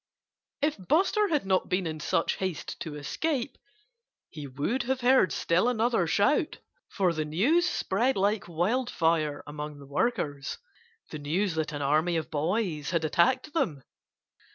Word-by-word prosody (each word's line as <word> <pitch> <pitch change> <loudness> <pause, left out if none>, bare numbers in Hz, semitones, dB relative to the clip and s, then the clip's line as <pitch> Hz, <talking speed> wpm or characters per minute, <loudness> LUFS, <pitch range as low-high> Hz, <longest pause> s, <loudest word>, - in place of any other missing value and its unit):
If 300 0 +1
Buster 395 - +3
had 300 - 0
not 190 -1 +1
been 185 -1 0
in 155 -1 -4
such 165 +1 0
haste 185 -4 -4
to 155 -3 -6
escape 255 - -2 0.7
he 150 -4 -8
would 145 - -1
have 260 +2 -1
heard 250 -5 +4
still 180 +8 +2
another 230 -6 +1
shout. 205 - +2 0.3
For 185 -3 +1
the 155 -1 -1
news 260 - +2
spread 240 - 0
like 200 +1 +1
wildfire 170 - 0
among 150 0 -6
the 140 - -12
workers 145 - -1 0.5
the 155 - -5
news 170 +6 0
that 160 -1 -2
an 145 -1 -4
army 155 +5 +2
of 160 +1 -4
boys 160 -1 -1
had 170 -3 0
attacked 255 - +2
them. 150 - -1
180 Hz, 150 wpm, -28 LUFS, 155-245 Hz, 0.7 s, heard